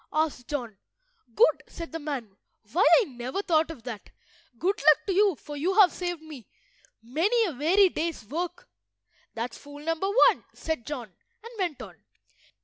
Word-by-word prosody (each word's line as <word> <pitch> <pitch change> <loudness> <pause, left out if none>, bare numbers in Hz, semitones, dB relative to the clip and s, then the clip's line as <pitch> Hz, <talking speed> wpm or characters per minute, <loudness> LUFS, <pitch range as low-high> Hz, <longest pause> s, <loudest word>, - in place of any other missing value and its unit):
asked 310 -6 -1
John. 240 -9 -4 0.6
"Good," 480 - +4
said 335 -2 -8
the 325 - -4
man. 270 -10 -5 0.4
"Why, 360 +6 +4 0.2
I - - +1
never 260 - -5
thought 320 -3 +2
of 295 -8 -9
that! 230 -4 -7 0.5
Good 380 - 0
luck 305 +1 +7
to 390 - 0
you, 395 -1 +4
for 295 +1 -9
you 345 +7 0
have 395 -4 +7
saved 350 -3 -4
me 295 -8 -11 0.6
many 365 - +2
a 365 - -2
weary 365 +8 +4
day's 330 -7 -3
work." 350 - -5 0.7
"That's 230 +1 -4
fool 290 +1 -12
number 330 +4 -1 0.2
one," - - -3
said 320 -7 -4
John, 245 -9 -6 0.3
and 460 - -10
went 345 -7 -2
on. - - -12
315 Hz, 165 wpm, -27 LUFS, 265-360 Hz, 0.7 s, luck